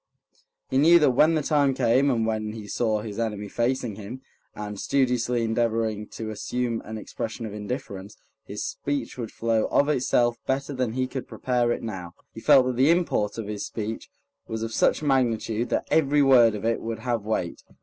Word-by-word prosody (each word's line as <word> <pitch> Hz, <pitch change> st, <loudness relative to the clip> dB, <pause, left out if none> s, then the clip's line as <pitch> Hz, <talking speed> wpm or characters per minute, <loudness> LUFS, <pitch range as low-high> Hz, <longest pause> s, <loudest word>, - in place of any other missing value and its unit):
He 130 Hz, -, +3 dB
knew 165 Hz, +4 st, +7 dB
that 150 Hz, -5 st, +4 dB
when 155 Hz, +6 st, +4 dB
the 155 Hz, -, 0 dB
time 140 Hz, -2 st, +2 dB
came, 130 Hz, +2 st, +3 dB
and 115 Hz, -4 st, +1 dB
when 110 Hz, -1 st, -2 dB
he 110 Hz, -2 st, -8 dB
saw 110 Hz, +1 st, 0 dB
his 105 Hz, 0 st, -6 dB
enemy 105 Hz, -3 st, -2 dB
facing 120 Hz, -1 st, -1 dB
him, 115 Hz, +6 st, -8 dB, 0.3 s
and 105 Hz, -1 st, -6 dB
studiously 125 Hz, -3 st, +1 dB
endeavoring 110 Hz, -2 st, 0 dB
to 110 Hz, -1 st, -6 dB
assume 120 Hz, +2 st, -2 dB
an 110 Hz, 0 st, -7 dB
expression 110 Hz, +2 st, -5 dB
of 105 Hz, -, -6 dB
indifference, 105 Hz, -2 st, -6 dB, 0.3 s
his -, -, -5 dB
speech 145 Hz, 0 st, -3 dB
would 115 Hz, -3 st, -4 dB
flow 115 Hz, -1 st, 0 dB
of 145 Hz, -, +2 dB
itself 120 Hz, -4 st, +2 dB
better 140 Hz, +2 st, -1 dB
than 125 Hz, -4 st, -1 dB
he 130 Hz, +1 st, 0 dB
could 130 Hz, 0 st, -6 dB
prepare 120 Hz, -2 st, 0 dB
it -, -, -2 dB
now. 90 Hz, -6 st, -6 dB, 0.2 s
He -, -, -8 dB
felt 135 Hz, +1 st, +6 dB
that 125 Hz, -1 st, -2 dB
the 135 Hz, +4 st, +4 dB
import 165 Hz, -, +1 dB
of 115 Hz, -, -4 dB
his 105 Hz, -1 st, -4 dB
speech 110 Hz, 0 st, -5 dB, 0.4 s
was 110 Hz, 0 st, -4 dB
of 115 Hz, 0 st, -4 dB
such -, -, +2 dB
magnitude 120 Hz, -4 st, +1 dB
that -, -, 0 dB
every 145 Hz, -2 st, +4 dB
word 120 Hz, -5 st, +6 dB
of 105 Hz, +1 st, -5 dB
it 115 Hz, 0 st, 0 dB
would 115 Hz, 0 st, -4 dB
have 120 Hz, -2 st, -1 dB
weight. 100 Hz, -5 st, -3 dB
115 Hz, 190 wpm, -25 LUFS, 110-130 Hz, 0.4 s, knew